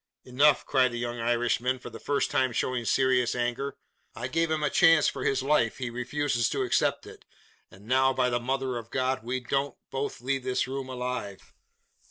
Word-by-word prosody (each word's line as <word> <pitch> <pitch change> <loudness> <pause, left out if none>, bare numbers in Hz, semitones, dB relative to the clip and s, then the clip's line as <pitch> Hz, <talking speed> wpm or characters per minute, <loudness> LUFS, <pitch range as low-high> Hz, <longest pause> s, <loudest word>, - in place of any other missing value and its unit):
"Enough!" 140 +3 +3
cried 130 -2 +3
the 120 - -5
young 120 0 -4
Irishman, 120 +2 +1
for 125 - -10
the - - -9
first 145 -1 -1
time 130 -1 +2
showing 125 -1 -1
serious 130 -1 +2
anger; 125 +3 -2 0.4
"I 120 +2 -4
gave 165 +4 +1
him 155 -1 -1
a 150 - +1
chance 165 -6 +5
for - - -3
his 130 -1 +1
life. 135 -5 +2
He 125 -2 -4
refuses 125 0 -1
to - - -1
accept - - +1
it: - - -13 0.5
and 95 +2 -17
now, 130 +2 +3
by 125 -1 +1
the 120 - +1
Mother 130 0 -2
of 115 -1 -8
God, 130 0 -1
we 125 +2 -2
don't 135 +2 -2
both 135 0 -3
leave 130 +2 -2
this 130 0 0
room 135 0 -5
alive! 125 -6 -5
130 Hz, 195 wpm, -27 LUFS, 120-135 Hz, 0.5 s, chance